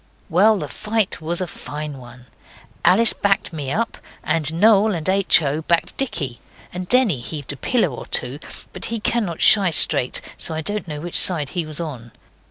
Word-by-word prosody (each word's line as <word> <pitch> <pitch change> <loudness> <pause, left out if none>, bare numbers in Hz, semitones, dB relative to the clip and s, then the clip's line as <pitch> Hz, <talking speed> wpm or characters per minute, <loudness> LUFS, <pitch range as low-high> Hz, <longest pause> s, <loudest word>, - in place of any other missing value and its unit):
Well, 205 +6 +4
the 150 - -4
fight 215 +2 -2
was 170 +3 -1
a - - 0
very 175 - -12
fine 150 -1 -6
one. 125 0 -14 0.6
Alice 225 +4 +5
backed 195 -3 0
me 145 -4 -5
up, 225 +8 -2 0.2
and 155 -2 -1
Noel 210 +3 +4
and 160 0 -4
H. 190 -3 +4
O. 145 +2 -1
backed 170 +1 0
Dicky, 145 - -4 0.3
and 180 0 -5
Denny 245 - +3
heaved 145 +2 -6
a - - -8
pillow 220 - 0
or 120 - -8
two; 125 +4 0 0.3
but - - -4
he 230 0 -3
cannot 210 -6 -2
shy 200 -3 +6
straight, 130 -5 +2 0.2
so 160 - 0
I 160 - -3
don't 205 +4 -3
know 150 -2 -6
which 175 +1 +2
side 155 -6 +3
he 170 -3 -3
was 155 0 -6
on. 130 -9 -7
170 Hz, 190 wpm, -21 LUFS, 145-200 Hz, 0.6 s, shy